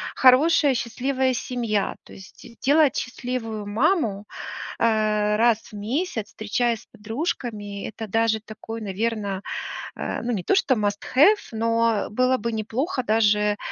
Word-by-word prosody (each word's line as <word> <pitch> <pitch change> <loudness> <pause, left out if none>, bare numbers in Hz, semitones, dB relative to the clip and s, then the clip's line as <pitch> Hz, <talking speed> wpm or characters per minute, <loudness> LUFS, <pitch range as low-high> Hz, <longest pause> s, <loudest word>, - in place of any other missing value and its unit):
хорошая 280 +2 +5
счастливая 260 +2 0
семья. 235 -5 -1
То - - -15
есть 190 - -14
де 230 - -16
делать 290 0 +4
счастливую 245 -4 -4
маму, 220 - +1 0.5
э, 215 -2 +2
раз 230 -1 +4
в - - -20
месяц, 225 - -2
встречаясь 230 +2 -1
с - - -21
подружками- 215 - -4
это 220 0 -7
даже 225 +1 +2
такой, 225 +1 -8
наверно, 205 -1 -2 0.5
э, - - -3
ну, 240 +1 -2
не 190 -5 -2
то - - +2
что 265 -8 +3
must 205 -2 -1
have, 375 +11 +7
но 230 -1 +1
было 255 +3 +2
бы 235 0 -3
неплохо 240 - -2
даже, 210 -2 +2
225 Hz, 140 wpm, -24 LUFS, 210-255 Hz, 0.5 s, have